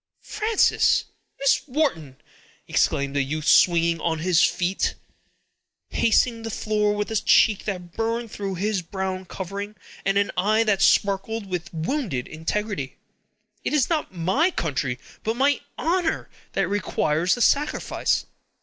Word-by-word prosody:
"Frances! 435 0 +2 0.3
Miss 275 0 +3
Wharton!" 245 - -1 0.5
exclaimed 140 0 +1
the 140 - +3
youth, 150 +3 -3
springing 170 -1 +4
on 165 -1 0
his 175 +1 +2
feet, 180 +2 0 1.0
and - - -4
pacing 230 +1 +3
the 225 - -5
floor 210 -1 0
with 210 +1 -3
a 220 - +1
cheek 210 0 +4
that 180 -4 -4
burned 230 +2 -2
through 195 -2 -4
its 205 +1 0
brown 190 +1 -4
covering, 200 +3 -6 0.3
and 195 +1 +1
an 200 0 +1
eye 215 +5 +3
that 205 -3 +1
sparkled 200 +3 +2
with 180 -3 -5
wounded 165 - -2
integrity. 160 -1 -3 0.7
"It - - -2
is 300 0 +2
not 315 -2 0
my 190 - +1
country, 140 - -2 0.3
but 225 +1 -1
my 280 +3 +2 0.2
honor, 340 0 -1 0.2
that - - +1
requires 180 -4 0
the 245 - -5
sacrifice. 290 +1 +1
200 Hz, 140 wpm, -24 LUFS, 170-225 Hz, 1.0 s, springing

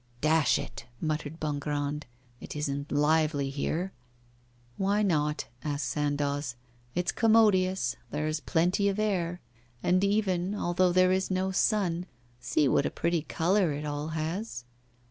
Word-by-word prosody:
'Dash 155 0 +3
it!' - - -7
muttered 155 0 -3
Bongrand, 145 0 -2 0.3
'it - - -8
isn't 140 -1 -3
lively 150 -1 +2
here.' 165 +6 -2 0.9
'Why 200 +2 +2
not?' 150 -6 +1 0.2
asked 145 -1 -2
Sandoz. 145 -3 -1 0.4
'It's 180 0 +1
commodious; 190 - +3
there 150 +1 -2
is 155 0 -1
plenty 180 +6 +2
of 195 - -2
air. 180 -5 -1 0.4
And 185 +2 +3
even 200 -2 +1
although 180 -1 +2
there 185 +1 +4
is 190 0 +1
no 190 0 0
sun, 180 -3 +1 0.3
see 140 +4 +1
what 140 - +3
a - - -1
pretty 170 -1 0
colour 175 +2 +1
it 150 +1 -4
all 145 0 -3
has. 160 - -3
160 Hz, 135 wpm, -29 LUFS, 150-185 Hz, 0.9 s, there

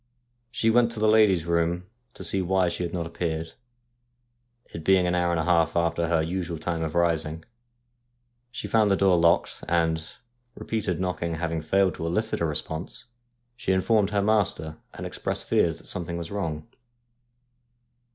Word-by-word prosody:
She 115 -2 +1
went 120 0 +4
to 110 - -4
the 110 - +3
lady's 105 -6 +4
room 85 +1 0 0.3
to - - -7
see 95 +2 +2
why 95 0 +2
she 85 - -4
had 85 -1 -2
not 85 -1 -3
appeared, 80 -1 -3 1.2
it 80 - -6
being 95 +1 +4
an 90 - +1
hour 90 -1 +1
and 85 -1 0
a - - 0
half 85 -1 +2
after 85 0 +1
her 80 -1 +2
usual 85 0 -3
time 85 +1 -3
of 80 0 -4
rising. 80 -2 0 1.0
She 120 - -6
found 110 -2 +3
the 100 - +4
door 95 -2 +4
locked, 85 0 +2
and, 80 -1 +1 0.5
repeated 100 -6 -3
knocking 90 -2 -2
having 80 0 -2
failed 95 +3 +2
to 85 - -3
elicit 110 +5 -1
a - - +2
response, 80 +2 -4 0.5
she 95 -6 -1
informed 100 +2 +2
her 100 -1 0
master, 100 -7 +1
and - - -8
expressed - - -3
fears 80 -1 +1
that - - -12
something 85 -1 -4
was 85 +1 -6
wrong. 80 -4 -3
85 Hz, 170 wpm, -26 LUFS, 80-95 Hz, 1.2 s, went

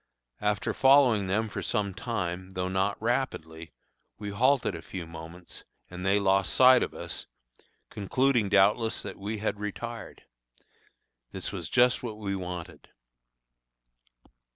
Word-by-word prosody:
After 105 0 0
following 130 -7 +5
them 110 +4 0
for 105 - -5
some 100 -2 -1
time, 95 -4 -4
though 90 -1 -2
not 95 +2 0
rapidly, 85 -9 -2 0.5
we 105 -1 -5
halted 125 +1 +2
a 85 - -7
few 90 -1 -7
moments, 85 +2 -10 0.3
and 90 0 -7
they 100 +1 +3
lost 95 -2 +2
sight 130 -1 +7
of - - -3
us, - - -5 0.6
concluding 120 +1 +1
doubtless 105 +3 +3
that - - -7
we 105 +3 -4
had 105 -1 -2
retired. 115 +3 -6 1.1
This - - -5
was - - -5
just 125 0 +4
what 110 -4 -6
we 100 -2 -3
wanted. 90 -3 -7
100 Hz, 130 wpm, -28 LUFS, 95-115 Hz, 1.1 s, sight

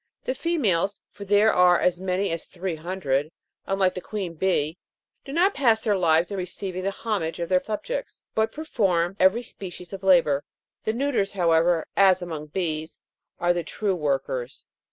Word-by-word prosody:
The 255 - -1
females 210 - 0
(for 200 - -9
there 205 +2 +4
are 180 -1 +5
as 180 -1 +1
many 190 +1 -1
as 165 -1 -4
three 185 -1 -4
hundred), 155 -4 -1 0.4
unlike 195 -1 +2
the 185 - -5
queen 195 -5 -4
bee, 165 -2 0 0.4
do 275 - -9
not 360 +7 +3
pass 230 -5 +3
their 210 -3 +2
lives 170 -1 +2
in 200 - -3
receiving 185 0 -4
the 195 - +1
homage 195 -6 -3
of 170 -1 -3
their 185 -1 +3
subjects, 485 - -5
but 220 0 +1
perform 195 - 0
every 190 +6 +4
species 180 -5 -8
of 195 - -6
labour. 165 -7 +4 0.4
The 220 - +1
neuters, 240 -6 0
however, 170 -2 +3
as 190 -2 +5
among 160 -4 -6
bees, 160 -1 -3 0.4
are 175 0 +3
the 175 -1 -2
true 200 +4 -1
workers. 135 -5 -2
185 Hz, 170 wpm, -25 LUFS, 170-205 Hz, 0.4 s, are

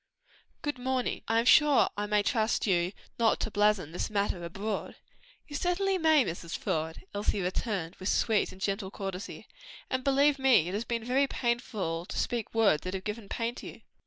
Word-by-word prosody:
"Good 290 -4 -2
morning. 255 0 -1
I 225 - +2
am 230 - +2
sure 295 +1 +6
I 205 0 -2
may 210 0 +2
trust 220 -1 +1
you 180 -3 +2 0.3
not 230 -1 +3
to 220 - -2
blazon 205 -6 +2
this 175 - -3
matter 200 -4 -1
abroad?" 195 +5 -4 0.5
"You 290 - -8
certainly 370 +4 +1
may, 315 -5 +5
Mrs. 170 0 -5
Faude," 160 0 -3
Elsie 205 0 -1
returned 185 -1 -2
with 185 - -3
sweet 220 -3 +2
and 185 - -13
gentle 195 0 -2
courtesy, 195 +1 -6 0.4
"and 260 -1 -1
believe 280 +1 +3
me, 260 -11 +5
it 180 - -4
has 215 +4 -2
been 230 -1 -2
very 260 +4 +2
painful 215 -10 -2
to - - -7
me - - -3
to - - +1
speak 235 -3 -2
words 205 -9 +4
that 185 +1 -4
have 190 - -5
given 210 0 -5
pain 230 0 -2
to - - -9
you." - - -11
215 Hz, 195 wpm, -29 LUFS, 190-250 Hz, 0.5 s, sure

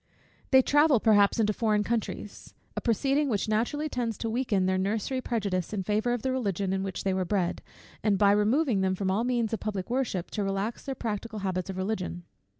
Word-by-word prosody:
They 265 -1 +6
travel, 290 -2 +4
perhaps, 205 0 +4
into 210 -1 +2
foreign 210 -1 +1
countries; 220 -2 -4 0.2
a - - -2
proceeding 275 +5 +1
which 210 -3 0
naturally 240 +8 0
tends 240 -6 -2
to 225 - -3
weaken 225 -6 +1
their 185 0 +1
nursery, 220 +7 -1
prejudice 200 -7 -2
in 195 -2 -2
favour 215 +5 0
of 240 -2 -2
the 260 - 0
Religion 200 -7 -1
in 190 - -1
which 195 -1 -4
they 195 - +1
were 185 0 0
bred, 180 -1 -1 0.4
and 205 -2 +2
by 200 0 +5
removing 215 +2 +2
them 190 0 +1
from 190 0 -1
all 210 +4 +1
means 240 -3 0
of 225 - -1
public 200 -2 -4
worship, 245 -9 -1
to 210 - -2
relax 195 +3 -2
their 270 -1 -3
practical 220 -1 -4
habits 185 -1 -2
of 190 - -5
Religion. 185 -3 -3
215 Hz, 205 wpm, -28 LUFS, 195-240 Hz, 0.4 s, They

